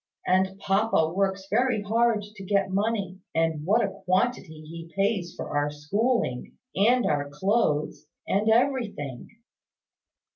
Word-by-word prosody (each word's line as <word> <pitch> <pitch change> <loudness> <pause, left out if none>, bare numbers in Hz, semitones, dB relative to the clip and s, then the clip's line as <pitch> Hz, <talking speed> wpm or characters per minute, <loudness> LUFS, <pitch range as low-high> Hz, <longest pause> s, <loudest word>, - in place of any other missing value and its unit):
And 190 +1 +2
papa 195 -5 +1
works 190 0 0
very 230 0 +1
hard 225 0 +2
to 205 -1 -11
get 195 0 +1
money; 200 -2 -1 0.2
and 160 -2 +1
what 210 +8 +3
a 195 0 -7
quantity 185 -4 0
he 165 +1 -10
pays 195 -3 0
for - - -6
our 145 0 +1
schooling, 150 - -1 0.2
and 235 +6 +3
our 145 -1 0
clothes, 150 -3 0 0.2
and 210 +3 +1
everything!" 220 - 0
195 Hz, 125 wpm, -26 LUFS, 160-220 Hz, 0.2 s, what